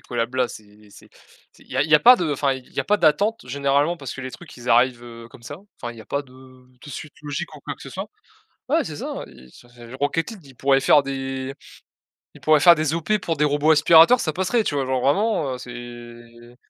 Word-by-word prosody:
collabs-là? 125 +1 -2
C'est 105 0 -14
c'est - - -17 0.4
c'est - - -21
il - - -24
y 130 - -5
a 135 - +3
il 160 - -4
y 155 - +5
a 150 - +6
pas 250 +1 +8
de 165 -7 -1
enfin, 140 0 0
il 130 -1 -12
y - - -1
a - - -4
pas 210 - +2
d'attente 170 - +1
généralement 140 +5 0
parce 135 -5 -7
que 130 - -8
les 130 0 -7
trucs 175 -6 -13
ils 120 0 -9
arrivent, 120 0 +3
heu, 115 -1 -11
comme 120 - -17
ça. 145 +7 -8 0.2
Enfin, 120 0 -5
il 115 - -15
y - - -10
a 110 - -12
pas 140 +3 -3
de 130 -3 -20
de 130 +1 -16
suite 150 +2 -9
logique 145 -2 -5
ou - - -12
quoi - - -6
que - - -16
ce - - -10
soit. - - -6 0.6
Ouais - - +2
c'est - - -7
ça, - - -6
i 65 0 -17
enfin, 120 - -21 0.2
je - - -10
Rocket 145 +6 -1
league 195 -7 -13
ils 135 - -16
pourraient 135 0 +2
faire 145 +2 +5
des 135 0 -5 0.8
ils - - -15
pourraient 155 -1 +4
faire 175 +1 +8
des 155 -1 -1
opérations 210 +6 0
pour 165 -2 -2
des 150 - +1
robots 150 +1 +2
aspirateur 165 +9 +6
ça 155 - -1
passerait, 190 +7 0
tu 145 - -2
vois? 135 - 0
Genre 130 -1 -1
vraiment, 150 - +1
heu, - - -7
c'est 120 -1 -11
135 Hz, 255 wpm, -22 LUFS, 125-155 Hz, 0.8 s, pas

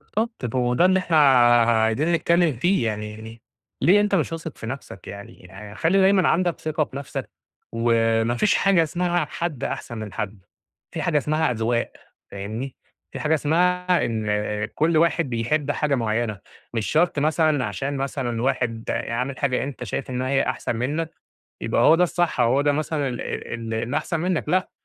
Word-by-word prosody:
طب 215 - -2
هو 125 -1 +1
ده 175 - +4
اللي 190 0 +4
أحنا 170 -3 +1 0.7
عايزين 135 +10 +1
نتكلم 170 -1 +2
فيه 175 -1 +1
يعني، 105 0 -3
يعني 110 +1 -11 0.4
ليه 185 +9 +5
أنت 205 -1 +1
مش 165 -3 0
واثق 165 -2 -6
في 115 - -7
نفسك 130 -6 -8
يعني؟ 100 +1 -10
خلّي 165 +8 +2
دايمًا 190 -1 +4
عندك 175 -1 +1
ثقة 155 0 -1
في - - -15
نفسك، 140 - -6 0.4
وما 115 0 +2
فيش 205 - +2
حاجة 195 -4 +4
اسمها 175 +1 0
حد 170 -7 -4
أحسن 120 -2 -4
من 110 -2 -7
حد 105 0 -4 0.5
في - - -3
حاجة 155 -3 +1
إسمها 155 0 +1
أذواق 115 +1 -1 0.4
فاهمني؟ 110 +7 -5 0.4
في - - -6
حاجة 155 - +1
اسمها 180 +4 +2
إن 110 -2 -2 0.5
كل 160 +1 +2
واحد 165 -3 +2
بيحب 140 +6 0
حاجة 145 -1 0
معيّنة 115 -3 -1 0.3
مش 110 -2 -1
شرط 165 -1 +2
مثلًا 155 -2 +2
عشان 135 +7 -3
مثلًا 130 -4 -2
واحد 120 -3 -1
عامل 125 +3 -2
حاجة 135 -3 0
أنت 135 -2 -6
شايف 125 +4 -4
إن 125 0 -2
هي 135 +1 +1
أحسن 120 -1 -2
منك 150 +8 -2 0.5
يبقى - - +1
هو - - +7
ده 180 +2 +4
الصح 175 -5 0
أو 120 0 +4
هو 140 - +3
ده 145 0 +2
مثلًا 150 -1 -1
ال 115 -1 -4
أحسن 155 +2 -1
منك، 175 -3 -1
لا 185 +2 +1
140 Hz, 170 wpm, -23 LUFS, 115-165 Hz, 0.7 s, هو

